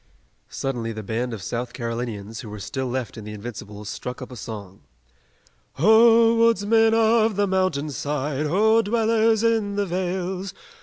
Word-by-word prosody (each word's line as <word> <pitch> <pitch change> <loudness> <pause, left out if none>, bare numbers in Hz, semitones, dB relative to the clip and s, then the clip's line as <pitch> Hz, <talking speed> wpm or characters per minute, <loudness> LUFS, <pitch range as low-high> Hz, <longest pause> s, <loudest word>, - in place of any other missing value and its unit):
Suddenly 120 -4 -3
the 110 0 -7
band 115 +4 -2
of 110 -5 -6
South 120 +3 -4
Carolinians, 115 -3 -5
who 115 - -8
were 105 - -7
still 105 +6 -4
left 125 -1 -4
in - - -9
the 105 0 -7
Invincibles, 105 -1 -8
struck 105 +5 -6
up 130 -1 -9
a - - -8
song: 100 -4 -8 0.9
"Ho, 225 - +6
woodsmen 225 0 +4
of 225 -1 +3
the 205 +1 +2
mountain 185 -6 0
side! 145 +1 -2
Ho, 220 +7 +4
dwellers 225 0 +2
in 220 -3 +1
the 205 0 0
vales! 185 +1 -3
150 Hz, 155 wpm, -23 LUFS, -, 0.9 s, Ho